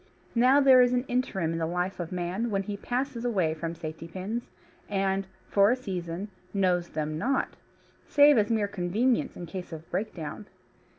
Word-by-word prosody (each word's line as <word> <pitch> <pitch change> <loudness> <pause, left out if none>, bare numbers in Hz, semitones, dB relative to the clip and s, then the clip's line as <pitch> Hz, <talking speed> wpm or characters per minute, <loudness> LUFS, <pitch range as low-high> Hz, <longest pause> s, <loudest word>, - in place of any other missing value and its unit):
Now 255 +4 +5
there 265 -2 +7
is 245 0 +4
an 250 +1 +1
interim 205 -10 0
in 165 - -2
the 160 - 0
life 180 +2 -2
of 170 -2 -4
man 180 +6 -2
when 195 -2 0
he 205 +1 -4
passes 245 +3 -3
away 190 -10 +1
from 165 +1 -4
safety 160 0 -7
pins, 195 +7 -5 0.4
and, 195 -1 0 0.2
for 200 0 +4
a 245 - +4
season, 185 -5 -5 0.3
knows 180 -3 +2
them 155 0 -3
not 270 +8 +1 0.6
save 290 0 +7
as 210 - +1
mere 220 -3 +2
convenience 210 +6 0
in 175 - -6
case 180 +2 -7
of 160 0 -8
breakdown. 195 -1 -4
195 Hz, 175 wpm, -28 LUFS, 175-240 Hz, 0.6 s, there